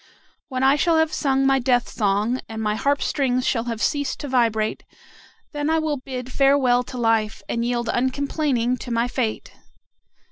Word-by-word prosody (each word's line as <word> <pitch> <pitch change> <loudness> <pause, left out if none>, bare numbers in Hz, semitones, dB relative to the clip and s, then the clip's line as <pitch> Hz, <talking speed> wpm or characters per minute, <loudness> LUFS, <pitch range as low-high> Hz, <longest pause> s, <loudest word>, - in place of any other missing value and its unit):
When 260 -2 -3
I 270 +2 +5
shall 330 +2 +2
have 320 0 +2
sung 270 -2 +1
my 270 0 +3
death 245 -1 +1
song, 210 +4 0
and 220 0 -6
my 210 -1 0
harp 280 +6 0
strings 255 -3 0
shall 230 -2 0
have 230 -2 -3
ceased 285 -2 -1
to 290 - -5
vibrate, 225 -4 0 0.7
then 295 0 -2
I 320 - +2
will 310 -2 -1
bid 255 -1 -7
farewell 270 -3 +3
to 255 - -8
life, 225 -2 0
and 235 - -2
yield 240 0 -1
uncomplaining 260 0 0
to 250 - -8
my 235 0 +1
fate." 245 -3 -3
255 Hz, 175 wpm, -22 LUFS, 235-275 Hz, 0.7 s, I